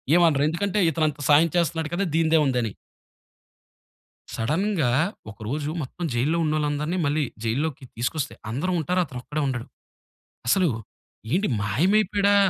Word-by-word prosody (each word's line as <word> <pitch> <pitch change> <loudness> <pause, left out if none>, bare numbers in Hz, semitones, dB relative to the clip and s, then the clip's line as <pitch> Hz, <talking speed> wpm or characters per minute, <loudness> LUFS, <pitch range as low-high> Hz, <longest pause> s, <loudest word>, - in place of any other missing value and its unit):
ఏమనరు. 160 -5 +4
ఎందుకంటే 200 +4 -1
ఇతను 155 +1 +1
అంత 145 - -9
సాయం 160 +3 +6
చేస్తున్నాడు 165 -2 0
కదా! 195 +3 +1
దీనిదేముందని. 145 -9 +2 1.6
సడెన్‌గా 155 - +1 0.4
ఒక 100 - -16
రోజు 145 +3 -2
మొత్తం 160 +6 -7
జైలులో 145 +8 +1
ఉన్నోళ్ళందరిని 150 +2 0
మళ్ళీ 145 +1 +1 0.2
జైలులోకి 135 +5 -1
తీసుకొస్తే 125 +2 -2 0.2
అందరు 145 +11 -1
ఉంటారు. 180 +4 0
అతనొక్కడే 140 +3 -5
ఉండడు. 120 -3 -3 0.8
అసలు 185 +3 +4 0.6
ఏంటి 195 +4 +2
మాయమైపోయాడా 200 - +2
155 Hz, 115 wpm, -25 LUFS, 135-175 Hz, 1.6 s, సాయం